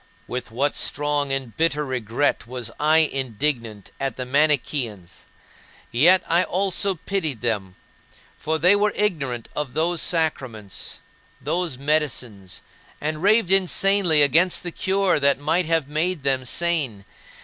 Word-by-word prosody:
With 125 0 -5
what 135 +6 0
strong 145 -1 0
and 135 -4 -3
bitter 150 -2 +1
regret 125 0 -1
was 125 -2 -6
I 155 +2 +4 0.2
indignant 120 -5 -3
at 135 -1 -2
the 130 - -5
Manicheans! 130 - -1 0.7
Yet 170 +10 +5
I 170 +2 +3
also 195 +1 0
pitied 160 - -3
them; 100 -6 -2 0.6
for 160 +1 -2
they 180 +5 +5
were 210 +1 +1
ignorant 140 - -1
of 140 -4 -4
those 170 +1 +1
sacraments, 130 - -2 0.4
those 175 -6 -2
medicines 130 -10 -2 0.4
and 155 +1 -3
raved 205 -1 +3
insanely 195 -4 +3
against 170 +6 +3
the 175 - -4
cure 190 -1 +1
that 140 0 +3
might 155 +5 0
have 165 -4 +1
made 155 +1 -2
them 135 -2 0
sane! 140 - -1
150 Hz, 130 wpm, -23 LUFS, 125-170 Hz, 0.7 s, Yet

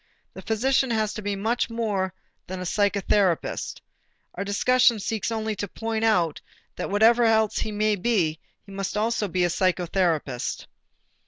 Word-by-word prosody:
The - - -9
physician 260 +4 +1
has 215 -2 0
to 215 - -6
be 205 -1 -2
much 225 +6 -1
more 210 -5 -1 0.4
than 185 0 -5
a - - -4
psychotherapist. 200 -2 0 0.5
Our 195 - -4
discussion 240 +4 +3
only - - -6
seeks 220 +1 -2
to 220 -3 -2
point 225 -1 -3
out 180 -9 +2 0.3
that - - -4
whatever 225 +4 +4
else 220 -2 +3
he 215 - -2
may 210 0 +1
be, 180 -7 0 0.3
he 200 - -13
must 195 0 -4
be - - +1
also 220 -1 0
a - - -11
psychotherapist. 175 -5 0
205 Hz, 155 wpm, -25 LUFS, 185-225 Hz, 0.5 s, whatever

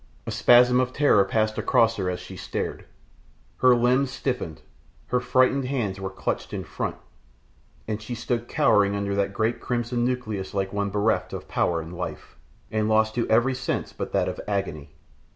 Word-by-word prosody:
A - - -4
spasm 125 +1 +5
of 130 0 0
terror 140 -9 +4
passed 110 +2 0
across 115 0 +3
her 95 -2 -1
as 90 - -3
she - - -10
stared; - - -4 0.7
her 130 -1 +5
limbs 125 +3 +2
stiffened; 125 - -4 0.5
her 125 - +2
frightened 130 +2 +2
hands 115 -8 -2
were 95 0 -3
clutched 95 - -4
in - - -3
front, - - -4 0.9
and 110 0 -3
she 120 +3 -5
stood 120 0 -2
cowering 100 -1 +3
under 100 0 -2
that 100 0 0
great 110 +3 -1
crimson 120 0 -1
nucleus 110 -7 -2
like 95 0 -1
one 100 0 -1
bereft 105 +3 0
of - - -6
power 85 -1 0
and 80 +2 -9
life, 90 - -6 0.4
and 110 0 0
lost 110 0 +3
to 120 0 -1
every 120 +4 +3
sense 125 -1 -3
but - - -5
that - - +1
of - - -4
agony. 95 -8 -3
110 Hz, 175 wpm, -25 LUFS, 100-125 Hz, 0.9 s, spasm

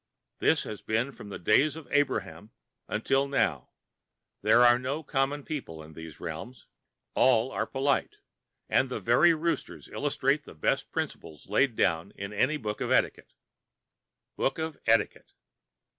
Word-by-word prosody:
This - - +3
has 105 -2 -7
been 115 +5 -1
from 105 - -11
the - - -6
days 135 - +3
of 160 -2 -10
Abraham 110 -7 0 0.4
until 135 +6 +1
now. 85 - 0 0.7
There 110 +4 +5
are 120 0 +6
no 140 +5 -3
common 140 +1 -1
people 125 - -6
in 80 +1 -13
these 80 -1 -10
realms. 100 +10 -7 0.5
All 125 0 +3
are - - -2
polite, 140 - 0 0.5
and - - +2
the - - -3
very 170 -1 +4
roosters 165 +2 -3
illustrate 145 0 0
the - - -14
best 75 - -1
principles 80 +2 -5
laid 120 +3 +2
down 85 0 0
in 100 +1 -6
any 135 +9 +1
book 105 -5 -5
of - - -1
etiquette. - - +1 1.0
Book 135 - 0
of 160 -1 -3
Etiquette! 115 0 +1
125 Hz, 145 wpm, -28 LUFS, 100-140 Hz, 1.0 s, are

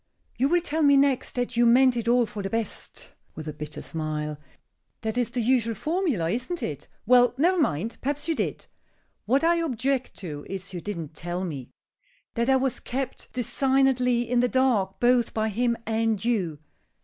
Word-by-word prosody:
"You 265 +4 +1
will 350 +1 +3
tell 320 -1 -2
me 285 -2 +6
next 275 -2 +2
that 245 -1 -2
you 240 - +4
meant 255 +1 +5
it 235 -1 -3
all 240 0 +4
for 210 -1 -6
the 195 - -3
best," 225 0 -4 0.2
with 155 -1 -7
a 155 - -4
bitter 150 0 -7
smile. 150 -2 -3 0.6
"That 220 0 -2
is 245 -2 +1
the 245 - -2
usual 230 -2 +2
formula, 300 - 0
isn't 255 - -3
it? - - -5 0.2
Well, 245 0 +5
never 355 +6 +3
mind; 220 - -1
perhaps 290 +3 -2
you 330 - +2
did. - - -3 0.6
What 270 +6 +3
I 340 +1 +4
object 270 -4 -1
to 150 -6 -7
is 195 0 -6
you 175 - -5
didn't 170 -7 -5
tell 175 +4 -4
me. 140 -8 -6 0.6
That 235 +2 0
I 265 - +5
was 265 -1 0
kept 265 +1 -5
designedly 250 -1 +2
in 245 +1 +2
the 245 0 +2
dark 235 -8 +1
both 245 -1 +3
by 220 0 +1
him 235 +2 0
and 225 -1 0
you. 190 -10 0
240 Hz, 185 wpm, -26 LUFS, 200-265 Hz, 0.6 s, me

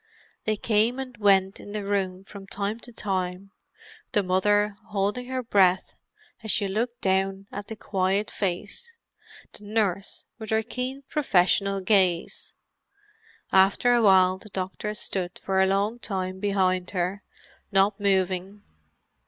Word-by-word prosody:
They 215 - +1
came 225 +4 +2
and 260 -2 -6
went 195 -2 +3
in 205 - -10
the 210 -1 -3
room 190 -2 -1
from 195 0 -11
time 205 +3 -3
to 240 - -10
time; 190 -3 -3 0.6
the 205 - +3
mother, 205 +3 +2
holding 210 +4 -1
her 255 0 -3
breath 190 -5 +3 0.5
as 220 - -7
she 205 -1 +3
looked 235 +5 -2
down 195 0 0
at 205 0 -6
the 220 - -6
quiet 195 0 -1
face; 210 - -4 0.6
the - - -10
nurse, 205 -2 -1
with 220 -1 -7
her 220 0 +2
keen, 255 +4 -5
professional 195 -7 +2
gaze; 185 -4 +1 1.0
after 195 +6 +4
a 240 - +4
while 190 -3 +5
the 215 - -13
doctor 195 +3 -4
stood 180 -3 -3
for 190 0 0
a 190 - +4
long 200 +5 0
time 190 -3 -3
behind 185 -3 +1
her, 180 +3 -1 0.5
not 195 +1 +3
moving. 195 0 0
200 Hz, 140 wpm, -26 LUFS, 190-215 Hz, 1.0 s, while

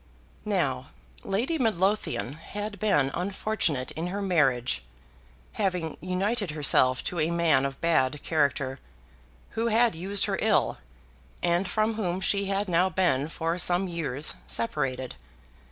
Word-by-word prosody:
Now - - 0 0.4
Lady 250 +12 -1
Midlothian 205 - 0
had 205 +6 -6
been 145 -11 +2
unfortunate 180 -7 -1
in 165 +2 -4
her 195 +3 -3
marriage, 135 - +1 0.7
having 180 - -1
united 195 +4 -1
herself 135 -4 +3
to 175 - -3
a 155 +1 +2
man 165 -6 +3
of 135 -1 -9
bad 150 -4 +1
character, 140 -4 0 0.7
who 225 +1 -1
had 230 0 +3
used 190 +5 +1
her - - -2
ill, - - +2 0.6
and 175 +2 +2
from 215 +1 +1
whom 185 -5 -2
she 200 +1 +1
had 195 +1 -1
now 180 +1 +3
been 160 -6 +1
for 165 +2 -2
some 180 +2 +2
years 155 -5 -1
separated. 130 +1 -1
175 Hz, 130 wpm, -27 LUFS, 145-200 Hz, 0.7 s, herself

